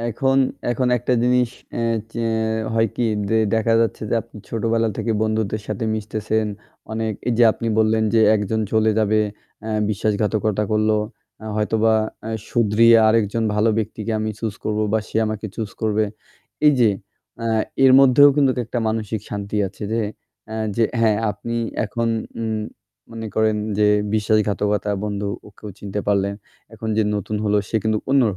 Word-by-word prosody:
এখন 135 +4 +1 0.3
এখন 125 +1 0
একটা 125 +2 -1
জিনিস 125 -1 +2 0.3
এ - - 0 0.3
যে 115 -1 -2 0.5
হয় 115 -1 +2
কি? 120 - +1 0.2
যে 110 - +3 0.2
দেখা 115 0 +2
যাচ্ছে 115 -1 -1
যে - - +2
আপনি 115 -1 -14
ছোটোবেলা 115 0 0
থেকে 115 - -1
বন্ধুদের 110 -1 -1
সাথে 105 +1 -3
মিশতেছেন 110 0 -2 0.5
অনেক 110 0 -1 0.2
এই - - +2
যে 120 - +7
আপনি 115 - -4
বললেন 110 0 +3
যে 115 - +5 0.2
একজন 105 +2 -1
চলে 110 0 +3
যাবে 110 0 +2 0.5
আ - - -3 0.2
বিশ্বাসঘাতকতা 105 0 0
করলো 110 0 +2 0.5
আ - - -8
হয়তোবা 110 +1 +2 0.3
আ - - -4 0.2
শুধরিয়ে 115 0 +5
আরেকজন 115 0 +1
ভালো 110 +2 +3
ব্যক্তিকে 110 0 -3
আমি 110 0 -1
choose 110 -3 -4
করবো 110 0 0
বা 110 - +3
সে - - -5
আমাকে 110 0 -4
choose 110 -3 -5
করবে। 110 0 +2 0.6
এই 150 - +7
যে 110 -3 +5 0.5
আ - - 0 0.4
এর 130 - +7
মধ্যেও 135 +2 +7
কিন্তু 140 -3 +4
একটা 120 +2 -3
মানসিক 110 -1 -2
শান্তি 100 0 -4
আছে 100 - -13
যে 115 - +1 0.5
আ - - -4 0.2
যে 115 - +3 0.2
হ্যাঁ 110 -2 +3
আপনি 115 +4 -5 0.3
এখন 115 +2 -2 0.3
উম 110 -1 -2 0.5
মনে 115 -1 -6
করেন 110 -1 +2 0.2
যে 105 - +4 0.3
বিশ্বাসঘাতকতা 105 -1 +1
বন্ধু 100 -1 -3 0.2
ওকেও 105 +1 -11
চিনতে 100 0 -4
পারলেন। 100 0 +1 0.4
এখন 110 +1 -6
যে 110 - +3
নতুন 105 +1 -3
হল 105 0 +1
সে 110 - 0
কিন্তু 110 -1 +1
অন্য 140 -1 +5
110 Hz, 165 wpm, -21 LUFS, 105-115 Hz, 0.6 s, যে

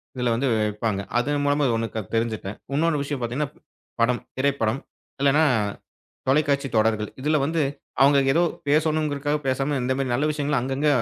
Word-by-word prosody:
இதுல 125 -2 0
வந்து 135 +4 0
வை 110 - +2
வெப்பாங்க. 105 -1 -2 0.2
அதன் 145 +3 0
மூலமா 145 0 +2
ஓண்ணு 115 0 -1
க - - 0 0.2
தெரிஞ்சுட்டேன். 110 -3 -2 0.2
உன்னோண்ணு 150 -1 +1
விஷயம் 140 -3 -4
பாத்தீங்கன்னா, 135 +5 -2
ப் - - -25 0.4
படம். 120 +1 +2 0.2
திரைப்படம். 130 -3 +1 0.4
இல்லைன்னா 145 +3 +4 0.8
தொலைக்காட்சி 140 0 +2
தொடர்கள். 110 -1 +2
இதுல 150 +2 +2
வந்து 160 +1 0 0.4
அவங்க 140 +1 +6 0.2
ஏதோ 170 - +3 0.3
பேசணும்ங்கறதுக்காகப் 150 -1 +1
பேசாம, 135 +2 0
இந்தமாரி 130 0 -1
நல்ல 150 +5 +1
விஷயங்களும் 145 -3 0
அங்கங்க 135 +3 -1
140 Hz, 155 wpm, -24 LUFS, 120-150 Hz, 0.8 s, அவங்க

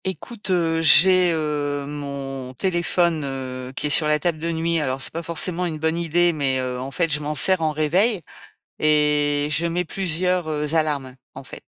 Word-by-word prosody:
Écoute, 200 +3 -6
heu, 165 -3 +1
j'ai, 180 +3 +6
heu, 145 -3 -2
mon 140 -3 -6
téléphone, 175 0 0
heu, 130 -2 -6
qui - - -4
est - - 0
sur 155 +2 +3
la 150 0 +2
table 160 +1 -2
de 165 +2 -3
nuit. 165 0 -1
Alors, 135 -3 -2
c'est - - -3
pas 165 - -4
forcément 170 +2 -1
une 160 -2 -4
bonne 160 +1 -1
idée, 170 +1 +1
mais, 135 -4 -1
heu, 125 -1 -4
en 130 +2 -5
fait, 155 +5 -1
je 150 - +2
m'en 150 +1 -4
sers 185 +3 +5
en 155 -1 +1
réveil 175 +8 +1 0.6
et 150 -1 +2
je 165 +3 +1
mets 170 +1 -1
plusieurs, 180 0 -1
heu, 150 0 -2
alarmes, 145 -5 -1 0.2
en 135 - -10
fait. 125 - -11
155 Hz, 195 wpm, -22 LUFS, 145-170 Hz, 0.6 s, j'ai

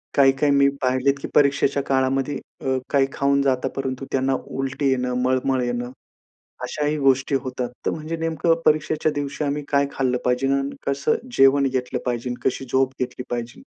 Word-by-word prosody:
काही-काही 140 +1 +4
मी 140 0 +5
पाहिलेत 130 +1 +2
की - - -4
परीक्षेच्या 140 -1 +3
काळामध्ये 135 +1 0 0.3
अ, 130 - +2
काही 140 -2 +3
खाऊन 140 0 +2
जातात 135 -1 +1
परंतु 135 0 -3
त्यांना 135 0 +1
उलटी 135 +1 -2
येणं, 125 -1 0
मळमळ 130 0 +1
येणं, 120 0 -3 0.7
अशाही 150 0 -1
गोष्टी 135 0 +2
होतात. 125 -2 -3 0.2
तर - - +2
म्हणजे 160 +1 -4
नेमकं 165 0 +1
परीक्षेच्या 155 0 +2
दिवशी 145 +1 -3
आम्ही 145 +1 -2
काय 140 0 +3
खाल्लं 130 -2 0
पाहिजे 125 +2 +1
आणि 140 0 -1
कसं 140 0 +1 0.2
जेवण 135 +1 +5
घेतलं 125 -1 -2
पाहिजे? 125 0 -2
कशी 135 0 -1
झोप 130 0 +2
घेतली 125 0 -3
पाहिजे? 120 -1 -5
135 Hz, 160 wpm, -23 LUFS, 130-140 Hz, 0.7 s, मी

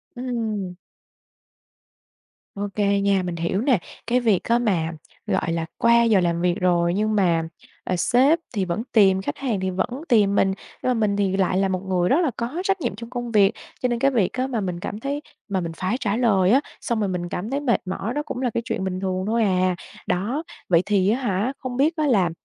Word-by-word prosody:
Ừm. 225 -7 -3 1.8
Ô 205 +1 -2
kê 200 -1 +2
nha, 200 -2 +2
mình 175 -1 -3
hiểu 170 +5 -1
nè. 250 -7 +3 0.3
Cái 245 +1 +3
việc 220 -7 +2
á, 235 +1 +2
mà, 175 -8 0 0.4
gọi 165 - 0
là, 165 -1 -1
qua 235 0 +5
giờ 220 -4 +4
làm 170 -1 0
việc 175 0 +2
rồi 175 -1 +2
nhưng 215 +2 0
mà, 170 -5 +2 0.4
ờ, 185 - -1
sếp 265 - +3 0.2
thì 190 -2 0
vẫn 180 +6 -2
tìm, 190 -4 +5
khách 145 - -4
hàng 240 -8 -1
thì 190 - -1
vẫn 185 +6 -1 0.2
tìm 205 -4 +4
mình, 195 - +3 0.3
nhưng 255 - +1
mà - - +3
mình 210 -3 +1
thì 195 -1 +1
lại 185 -1 +1
là 195 0 +2
một 185 -1 -1
người 180 -2 0
rất 315 +7 +4
là 305 -7 +1
có 255 +10 -3
trách 390 -2 0
nhiệm 240 -6 -2
trong 230 +2 -9
công 240 -2 -4
việc. 205 -1 +5 0.3
Cho 250 - +2
nên 235 -1 -1
cái 275 +1 +3
việc 215 -8 +1
á, 255 0 -1
mà 235 -5 -2
mình 180 -2 -3
cảm 205 +4 -5
thấy 280 +3 -3 0.3
mà 195 -3 -1
mình 165 -1 -4
phải 190 +6 -1
trả 215 -2 0
lời 200 -6 +3
á, 270 +3 +5 0.2
xong 235 -3 -1
rồi 205 - +1
mình 175 -1 -3
cảm 205 +6 -4
thấy 280 +1 -1
mệt 255 -5 +1
mỏi 195 +5 -3
đó 295 - -1
cũng 250 - -5
là 250 - +1
cái 230 - 0
chuyện 225 -6 -2
bình 185 -1 -2
thường 185 -1 -2
thôi 230 0 +2
à. 185 -2 +2 0.3
Đó. 235 - -1 0.3
Vậy 170 -1 +5
thì 200 -2 +2
á 235 - +1
hả, 215 +3 0
không 255 -1 -5
biết 305 +5 +3
á, 305 -1 +1
là, 195 -9 +3
205 Hz, 235 wpm, -23 LUFS, 185-240 Hz, 1.8 s, qua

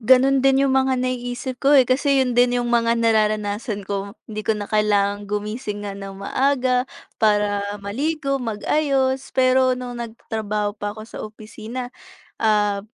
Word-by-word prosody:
Gano'n 260 +3 +5
din 270 +1 +4
'yong 270 - +2
mga 265 0 +2
nai-isip 250 0 -3
ko, 285 +1 +4
eh. 260 - +7
Kasi 270 +2 +2
'yon 250 -2 +1
din 245 0 +4
'yong 240 0 -1
mga 230 -1 +3
nararanasan 215 -1 0
ko. 200 +1 -4
Hindi 215 0 -4
ko 220 - +3
na 205 - -5
kailangang 205 -1 +1
gumising 210 0 -4
nga 200 - -4
ng 195 -1 -8
maaga 255 +4 +1 0.3
para 205 -1 +2 0.2
maligo, 275 +6 -1
mag-ayos. 265 +3 0
Pero 255 0 +4
no'ng 245 -1 -6
nag-tatrabaho 215 -2 -3
pa 205 0 -3
ako 215 - -9
sa - - -10
opisina, 220 +3 -8 0.5
ah, 210 -2 +2
230 Hz, 155 wpm, -22 LUFS, 210-260 Hz, 0.5 s, eh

